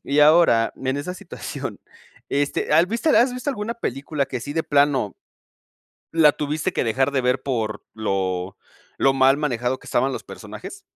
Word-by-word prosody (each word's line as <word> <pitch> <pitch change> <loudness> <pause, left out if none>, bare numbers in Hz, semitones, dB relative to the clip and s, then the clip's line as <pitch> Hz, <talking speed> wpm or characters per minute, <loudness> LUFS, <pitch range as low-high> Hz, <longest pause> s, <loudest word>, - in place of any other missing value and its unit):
Y 145 +2 +2
ahora, 150 -7 +5
en 130 +1 -2
esa 150 +6 -4
situación 185 - -7 0.5
este, 145 +1 -1
¿has 170 +3 +5
visto 235 +9 0
has 245 -1 +4
visto 250 +3 -3
alguna 230 -2 -4
película 140 - -3
que 125 -2 -4
sí 145 +5 -5
de 160 +1 -1
plano, 140 - +2 1.0
la 160 -2 +6
tuviste 150 +5 -2
que - - 0
dejar 130 +4 +1
de 135 - +1
ver 125 +1 +1
por 110 -6 -2
lo 95 -3 -2 0.4
lo 135 - +3
mal 135 +1 +4
manejado 125 -3 -1
que - - -18
estaban 135 +1 +1
los - - -5
personajes? 395 - -10
140 Hz, 170 wpm, -23 LUFS, 125-160 Hz, 1.0 s, la